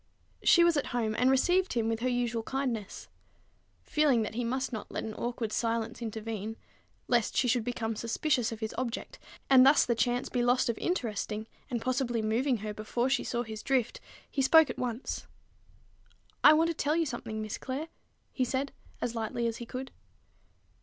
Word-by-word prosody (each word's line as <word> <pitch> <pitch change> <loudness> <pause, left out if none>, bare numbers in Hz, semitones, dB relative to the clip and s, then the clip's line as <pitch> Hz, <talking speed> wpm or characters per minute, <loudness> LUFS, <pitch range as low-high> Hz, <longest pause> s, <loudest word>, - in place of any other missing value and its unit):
She 345 - +6
was 340 -2 +4
at 285 - 0
home, 220 -2 0
and 250 +3 +3
received 360 +8 +3
him 230 -2 0
with 225 0 -1
her 255 +2 0
usual 240 -2 0
kindness. 235 -5 -3 0.8
Feeling 285 -7 +3
that 215 - -4
he 245 +2 -2
must 260 +2 -2
not 220 - -5
let - - -3
an 220 - -5
awkward 235 -1 -3
silence 230 0 -1
intervene, 220 -1 -4 0.5
lest 240 -3 +1
she 250 - +3
should 245 -1 +2
become 225 -1 -2
suspicious 235 +2 0
of 225 0 -7
his 220 - -3
object, 250 -2 -4 0.3
and 260 -2 +7
thus 275 +3 +6
the 240 - +2
chance 245 +2 0
be 245 - -1
lost 245 0 +3
of 230 - -1
interesting, 220 - -2 0.2
and 235 -3 -2
possibly 250 -3 0
moving 240 +4 +1
her 210 - -3
before 235 +4 -1
she 275 - +2
saw 240 0 -2
his 220 -2 -7
drift, 255 -4 0 0.3
he 275 - -1
spoke 320 +3 +6
at - - -9
once. 245 0 -3 1.2
"I 300 - +10
want 325 +2 +3
to - - 0
tell 300 -1 0
you 335 0 +2
something, 230 -5 -5
Miss 215 -1 -4
Clare," 275 +5 -4 0.4
he 260 - 0
said 265 +2 -1 0.3
as 235 - -1
lightly 230 +1 -2
as 230 -1 -1
he 235 - -8
could. 260 +2 -6
240 Hz, 185 wpm, -30 LUFS, 225-265 Hz, 1.2 s, I